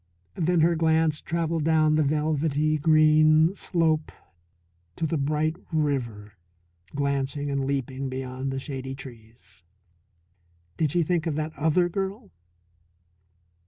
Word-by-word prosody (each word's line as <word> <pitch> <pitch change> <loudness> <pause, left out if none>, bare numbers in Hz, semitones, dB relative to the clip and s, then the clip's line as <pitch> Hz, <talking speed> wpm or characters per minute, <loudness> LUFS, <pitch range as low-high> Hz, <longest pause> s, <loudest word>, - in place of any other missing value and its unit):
Then 170 0 +1
her 170 +1 +3
glance 160 -1 +2
travelled 165 -1 -1
down 155 -1 +3
the 155 - +3
velvety 155 0 0
green 155 +1 +5
slope 160 -5 0 0.8
to 165 - -2
the 160 - -1
bright 155 +3 0
river 125 - -2 0.6
glancing 140 0 -1
and 140 -1 -1
leaping 135 -1 -3
beyond 130 0 -4
the 135 - -3
shady 135 -1 -6
trees. 115 -7 -13 1.1
Did 155 - 0
she 175 +1 +2
think 170 0 -1
of 155 - -1
that 155 +1 -3
other 160 +4 +2
girl? 195 - -4
155 Hz, 120 wpm, -26 LUFS, 135-160 Hz, 1.1 s, green